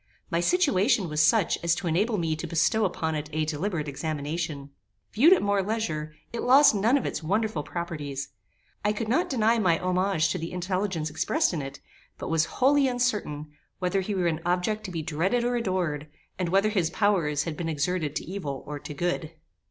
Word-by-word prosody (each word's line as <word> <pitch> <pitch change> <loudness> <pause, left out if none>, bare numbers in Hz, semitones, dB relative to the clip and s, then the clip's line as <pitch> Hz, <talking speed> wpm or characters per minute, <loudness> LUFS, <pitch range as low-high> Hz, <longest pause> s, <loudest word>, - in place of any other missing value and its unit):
My 170 - +1
situation 225 - +2
was 150 0 +1
such 170 +5 +3
as 170 0 +3
to 180 - -5
enable 205 +7 +1
me 165 -3 0
to 165 +2 -5
bestow 170 +7 +2
upon 160 -3 -1
it 150 0 -4
a 155 0 0
deliberate 155 +1 -2
examination. 145 0 -4 0.4
Viewed 285 +11 +6
at 380 - +5
more 200 -1 +2
leisure, 170 -8 -3 0.2
it 235 - -3
lost 270 +2 +6
none 220 +6 +3
of 275 - -3
its - - -3
wonderful 205 +1 0
properties. 145 -5 -5 0.5
I 210 0 +2
could 215 +1 -3
not 290 +11 +1
deny 230 -3 +2
my 180 -6 +3
homage 185 -3 +1
to - - -2
the 165 +2 -5
intelligence 185 -3 -2
expressed 250 - +1
in 160 - -2
it, 135 +1 -8 0.4
but - - -5
was 165 -1 +3
wholly 275 +1 +4
uncertain, 210 - -1 0.3
whether 185 +1 0
he 200 +2 -3
were 185 -2 0
an 165 -1 0
object 180 +5 0
to 190 - -5
be 165 -2 -3
dreaded 180 +11 0
or 245 0 0
adored, 180 -9 -1 0.3
and 180 -2 0
whether 195 +4 +3
his 185 -7 +1
powers 170 -9 +1
had 165 -2 -4
been 165 +1 -3
exerted 160 0 -1
to - - -3
evil 150 -7 -5
or 145 0 -6
to 150 - -8
good. 170 0 -2
175 Hz, 195 wpm, -27 LUFS, 155-210 Hz, 0.5 s, Viewed